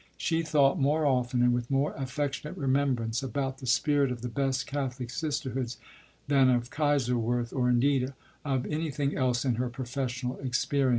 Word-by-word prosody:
She 165 -1 0
thought 155 0 +3
more 150 +3 +2
often, 125 -2 +2
and 125 0 +4
with 120 0 -2
more 135 +1 +1
affectionate 145 +4 -3
remembrance, 130 -5 +1
about 135 +1 -3
the 130 - -7
spirit 140 +1 +3
of 120 -1 -5
the 125 - -2
best 135 +1 0
Catholic 130 -4 -3
sisterhoods 130 -5 -3 0.5
than 135 -2 +5
of 120 0 +1
Kaiserswerth, 125 -5 +1
or 125 -2 +1
indeed 130 +1 +2 0.3
of 135 -3 -1
anything 150 -2 -1
else 125 -1 +1
in 125 -4 +1
her 125 - -1
professional 125 0 -4
experience. 135 +1 +1
130 Hz, 160 wpm, -29 LUFS, 125-140 Hz, 0.5 s, than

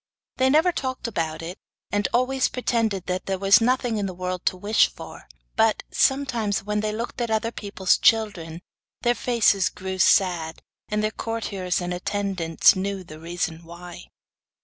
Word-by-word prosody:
They 260 0 +3
never 315 +6 +4
talked 260 -6 -4
about 165 -7 -3
it, 175 +4 -7 0.3
and 205 0 +1
always 255 +2 +2
pretended 225 -6 -1
that 185 0 -3
there 195 -1 -1
was 195 +4 +5
nothing 245 -1 +1
in 200 - -1
the 185 - -7
world 180 0 -4
to 185 - +1
wish 205 +4 +3
for; - - -11 0.3
but, 225 -1 +2
sometimes 240 -8 +1
when 210 +1 -1
they 215 0 -1
looked 230 +3 -5
at 235 - -1
other 220 +1 0
people's 200 -4 0
children, 185 -7 +1 0.4
their 240 - +3
faces 225 -5 +2
grew 190 0 -6
sad, 175 -4 +2 0.3
and 210 0 -1
their 215 - 0
courtiers 205 -5 -3
and 175 0 -3
attendants 180 -3 +2
knew 195 0 -3
the 155 -3 -12
reason 170 0 -4
why. 175 +1 -10
200 Hz, 165 wpm, -24 LUFS, 180-230 Hz, 0.4 s, was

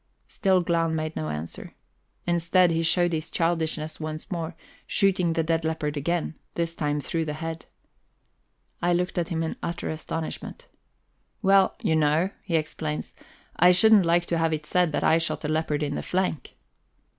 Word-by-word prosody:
Still 190 -2 +2
Glahn 165 -1 +1
made 155 0 -3
no 75 - -3
answer. 75 +2 -6 0.5
Instead, 175 +1 +3
he 165 0 +1
showed 175 +1 +2
his 155 0 -2
childishness 160 -2 -1
once 155 +4 -6
more, 165 -1 -3 0.3
shooting 185 -4 +2
the 165 - +1
dead 165 0 0
leopard 155 -2 -2
again, 160 +2 -1 0.2
this 165 -1 -1
time 150 -2 -1
through 165 +3 -2
the 150 -1 -3
head. 165 +1 -6 1.1
I 175 0 +2
looked 180 +1 0
at 170 - -2
him 165 -1 -1
in 160 - -3
utter 170 -1 -3
astonishment. 165 - -5 0.8
"Well, 195 -1 +5
you 160 - +2
know," 155 +4 +2
he 170 - -2
explains, 155 -1 -2 0.4
"I 180 +1 +7
shouldn't 210 -1 +6
like 170 +1 +3
to 170 -1 -1
have 165 -1 +2
it 155 -1 -3
said 180 +1 +2
that - - 0
I 165 - +4
shot 165 -1 -2
a - - 0
leopard 155 -1 0
in 145 -1 -1
the - - -3
flank." 185 -4 -2
165 Hz, 170 wpm, -26 LUFS, 155-175 Hz, 1.1 s, I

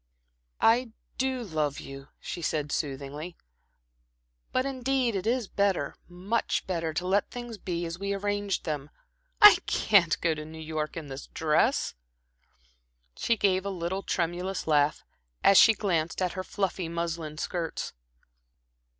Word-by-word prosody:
"I 230 0 +3 0.3
do 260 -1 0
love 155 -7 -1
you," 135 0 -9
she 175 - -6
said, 150 -2 -1
soothingly, 145 +3 -4 1.1
"but 255 - +1
indeed 260 -3 0
it 195 +2 -2
is 240 -2 +1
better 195 -8 0 0.2
much 190 +6 -1
better 165 -3 -2
to 170 +3 -3
let 195 +2 +2
things 240 -3 -7
be 175 -2 -3
as 165 +1 -5
we 200 0 -2
arranged 205 -1 -1
them. 150 -2 -3 0.5
I 415 - +11
can't 185 -6 +3
go 165 -1 +2
to 155 0 -6
New 160 +1 -10
York 155 0 -4
in 160 - -5
this 135 +1 -7
dress" 155 -1 +1 1.2
she 230 - +1
gave 190 -2 +2
a 200 - -3
little 185 +1 -3
tremulous 180 +1 -2
laugh, 150 -1 +2 0.4
as 195 - +8
she 225 - +7
glanced 170 -6 -1
at 180 -2 0
her 185 - -4
fluffy 185 -3 -2
muslin 165 -2 -3
skirts. 170 0 -3
180 Hz, 140 wpm, -28 LUFS, 160-205 Hz, 1.2 s, I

